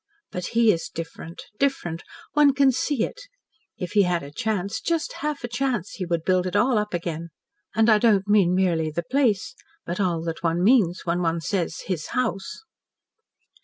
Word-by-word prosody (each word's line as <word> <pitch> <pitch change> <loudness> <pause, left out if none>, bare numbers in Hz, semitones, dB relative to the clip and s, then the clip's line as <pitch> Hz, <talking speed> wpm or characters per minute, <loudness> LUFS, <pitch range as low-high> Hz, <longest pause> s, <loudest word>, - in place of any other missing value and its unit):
But 180 -1 -4
he 230 -2 +6
is 165 -3 -3
different 165 +1 -8 0.2
different. 175 -12 -1 0.3
One 290 -2 +5
can 275 -1 +5
see 255 -1 0
it. - - -5 0.6
If 180 -2 -5
he 210 - +4
had 180 -4 +1
a 140 - -9
chance 205 +4 -2
just 330 -2 -1
half 300 -3 -2
a - - -2
chance 240 -5 -2
he 185 -3 -5
would 170 -2 -1
build 185 0 +2
it 180 - -4
all 245 -3 +3
up 210 -3 -2
again. 170 -1 -4 0.5
And 225 0 +4
I 215 -2 +6
don't 205 -4 +3
mean 195 -4 +4
merely 170 -4 +1
the 170 +3 -3
place, 255 - +1 0.3
but 175 +3 -4
all 175 -4 0
that 165 -1 -4
one 170 +1 0
means 200 -6 +4
when 175 +1 0
one 165 -1 0
says 175 +2 -2
'his 175 -5 -3
house.'" 195 - -2
190 Hz, 185 wpm, -24 LUFS, 170-235 Hz, 0.6 s, he